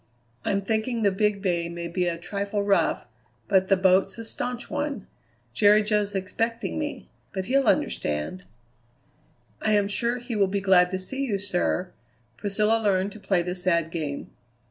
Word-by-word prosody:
I'm 200 0 0
thinking 220 +3 -1
the 200 - +4
Big 205 0 0
Bay 170 -3 0
may 170 0 -5
be 180 +1 -1
a 170 -1 -1
trifle 200 +3 -2
rough, 200 -1 +2 0.4
but 190 -1 +3
the 195 - +4
boat's 190 +1 +3
a 230 - -7
staunch 245 +2 -4
one. 290 -7 -3 0.5
Jerry 210 - +5
Jo's 210 -1 0
expecting 225 +8 -2
me; 295 -1 -4 0.3
but 190 -1 -3
he'll 270 +2 +2
understand." 75 - 0 1.2
"I 215 - +2
am 205 -1 +3
sure 235 +4 0
he 245 -1 -5
will 200 -2 +3
be 200 +1 -1
glad 185 -2 +5
to 185 - -2
see 265 +9 -3
you, 220 -7 0
sir." 185 -2 -1 0.4
Priscilla 210 - +1
learned 195 -2 +1
to 215 - -11
play 190 -4 +1
the 180 +1 -3
sad 170 -3 0
game. 150 -4 -4
200 Hz, 165 wpm, -26 LUFS, 185-215 Hz, 1.2 s, Jerry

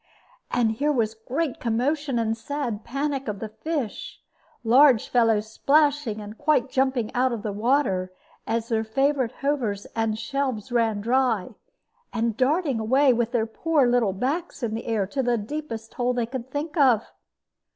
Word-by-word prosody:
And 230 -2 +2
here 285 +7 0
was 225 -6 0
great 255 +6 -3
commotion 265 +4 0
and 225 -1 0
sad 230 -3 -4
panic 275 0 -2
of 210 -1 -3
the 215 +2 -6
fish, 310 - -4 0.4
large 250 0 +5
fellows 225 -3 +2
splashing 285 -4 +2
and 210 +1 -9
quite 290 -3 +2
jumping 260 -4 0
out 255 +1 +2
of 230 -2 -5
water, 210 -6 +1 0.4
as 230 0 -1
their 225 -1 +1
favorite 270 +2 +1
hovers 240 -9 -1
and 225 -1 0
shelves 255 0 -3
ran 225 -3 +1
dry, 235 -3 +1 0.6
and 230 -2 -1
darting 275 0 +1
away, 260 +5 +4
with 235 0 0
their 235 -3 +1
poor 295 +5 +1 0.3
backs 275 - -3
in 220 -2 -1
the 225 +2 -5
air, 220 -4 +1
to 270 +8 -2
the 245 -2 +1
deepest 225 -1 -6
hole 250 0 0
they 240 -2 0
could 255 +1 -6
think 295 +3 -4
of. 250 -7 +4
240 Hz, 155 wpm, -25 LUFS, 225-275 Hz, 0.6 s, large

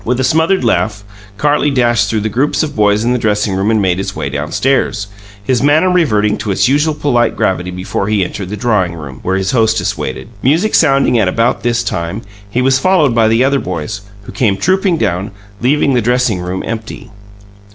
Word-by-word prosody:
With 125 +2 -1
a - - +1
smothered 160 +5 +2
laugh, 110 -3 0 0.3
Carlie 145 +3 +1
dashed 120 -4 +1
through 110 -2 -1
the - - -5
groups 130 +9 0
of 155 - -5
boys 105 0 +2
in 120 +1 +1
the 125 - 0
dressing 105 -2 0
room 95 +3 0
and 110 -1 +2
made 95 -2 0
his 95 - -4
way 70 - -4
downstairs, 105 - -1 0.4
his 125 +2 0
manner 155 +6 +3
reverting 105 -13 +1
to 105 - -4
its 95 - +2
usual 150 +3 +1
polite 125 -6 +1
gravity 90 -1 -1
before 90 +2 -3
he 105 -3 +1
entered 95 +1 -6
the 105 - -5
drawing 105 -8 0
room, 70 -5 -9
where 95 +1 -1
his 95 0 -1
hostess 110 -3 +1
waited. 65 - -5
Music 165 - +1
sounding 135 -4 +3
at 100 - +2
about 115 +6 0
this 120 0 0
time, 85 +6 -4 0.3
he 125 +5 0
was 135 0 +3
followed 155 -5 +2
by 115 -1 +3
the 115 +3 +3
other 140 +1 +2
boys, 90 - -5 0.2
who - - -10
came 105 -6 0
trooping 185 - +1
down, 100 - -1 0.3
leaving 140 +2 +2
the 125 - +2
dressing 125 -3 +1
room 90 +1 -4
empty. 110 -1 -6
115 Hz, 205 wpm, -14 LUFS, 100-135 Hz, 0.4 s, manner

